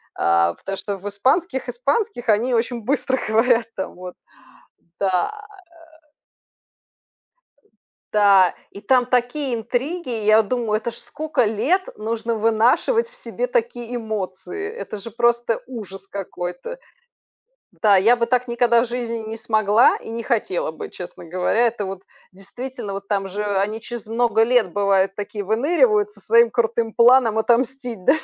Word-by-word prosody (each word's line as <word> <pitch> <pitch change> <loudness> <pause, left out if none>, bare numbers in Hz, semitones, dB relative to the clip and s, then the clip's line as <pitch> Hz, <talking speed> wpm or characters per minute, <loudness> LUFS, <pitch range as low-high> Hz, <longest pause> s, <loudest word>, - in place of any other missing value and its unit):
а, 85 0 +2
потому 195 - -6
что 200 0 -4
в 195 +2 -8
испанских 265 - 0
испанских 255 - -1
они 225 +4 +2
очень 235 0 0
быстро 265 +1 0
говорят 230 +2 +3
там. 190 - -5
Вот, 180 0 -9 0.9
да, 190 - +1 0.2
э. 405 - -17 2.6
Да 200 -3 +5 0.2
и 200 - -11
там 250 +3 +3
такие 250 +2 0
интриги, 255 +8 -3
и - - -4
я 215 +1 +6
думаю, 225 -1 -1
это 235 +2 -4
ж - - -11
скока 295 -1 -2
лет 240 - +1 0.2
нужно 225 +1 -2
вынашивать 230 - +2
в - - -22
себе - - -4
такие 445 - -2
эмоции! 220 - -5
Это 450 - -7
же 215 +3 -9
просто 235 0 +1
ужас 195 -6 -9
какой-то! 190 - -6 1.0
Да, 205 -3 +5
я 220 +6 +5
бы 235 -1 0
так 250 +1 0
никогда 235 -1 +3
в - - -7
жизни 235 -1 -3
не 220 0 -6
смогла 220 0 +3
и - - -10
не 230 +1 -4
хотела 215 -9 -1
бы, - - -8
честно 180 -1 -9
говоря. 180 +6 0
Это 225 -3 -2
вот 190 0 -7 0.3
действительно 225 +3 -7
вот, 195 0 -7
там 195 -2 -1
же 205 +3 -4 0.2
они 210 +3 -1
через 235 0 -7
много 225 0 +2
лет, 230 -5 +2
бывает, 195 -1 +2
такие 205 0 -5
выныривают 220 - +2
со 205 -1 -19
своим 230 +3 +4
крутым 230 -1 0
планом 235 -1 +5
отомстить, 240 -2 0
да. 270 - +5
230 Hz, 150 wpm, -21 LUFS, 205-250 Hz, 2.6 s, я